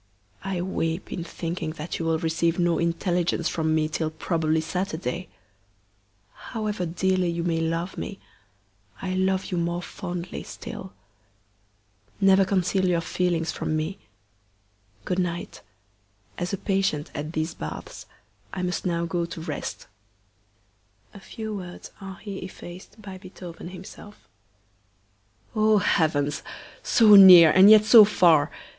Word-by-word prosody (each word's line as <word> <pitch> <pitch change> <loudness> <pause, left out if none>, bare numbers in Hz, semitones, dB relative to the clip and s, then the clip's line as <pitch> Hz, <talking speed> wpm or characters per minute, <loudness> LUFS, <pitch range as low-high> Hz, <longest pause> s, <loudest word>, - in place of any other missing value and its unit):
I 190 -2 -3
weep 165 -2 -3
in 175 - -4
thinking 165 -1 -5
that 155 +1 -6
you 165 - -3
will 165 0 +1
receive 165 +1 0
no 175 -2 +1
intelligence 170 0 0
from 160 -1 0
me 155 -1 +1
till 155 0 -2
probably 160 0 -1
Saturday. 180 +1 -4 1.0
However 210 -6 -4
dearly 185 +1 0
you 170 0 -2
may 165 -1 0
love 165 +3 -3
me, 200 - -6 0.8
I 185 -1 -3
love 190 +1 0
you 180 - -1
more 170 +1 -2
fondly 180 -2 -6
still. 95 - -9 1.3
Never 195 -1 +5
conceal 190 0 +1
your 175 -2 +2
feelings 170 -1 -1
from 155 - -3
me. 165 +6 -4 1.1
Good 180 - -1
night! 175 -1 -4 0.7
As 175 0 -4
a 195 - -2
patient 190 -6 -1
at 150 +1 -5
these 155 +1 -2
baths, 75 - -8 0.4
I 185 - -4
must 180 +1 -2
now 170 -1 -1
go 170 0 -2
to 170 - -8
rest - - -6 1.3
[a 200 - -11
few 220 +2 -7
words 180 -3 -9
are 190 -1 -8
here 200 -3 -7
effaced 185 +3 -11
by 190 -2 -9
Beethoven 180 -2 -10
himself]. 190 +3 -12 1.3
Oh, 215 0 +4
heavens! 145 -6 +1 0.4
so 220 -3 +5
near, 180 -5 +10
and 190 +2 +7
yet 215 -1 +8
so 220 0 +9
far! 170 -7 +4
175 Hz, 135 wpm, -25 LUFS, 165-190 Hz, 1.3 s, near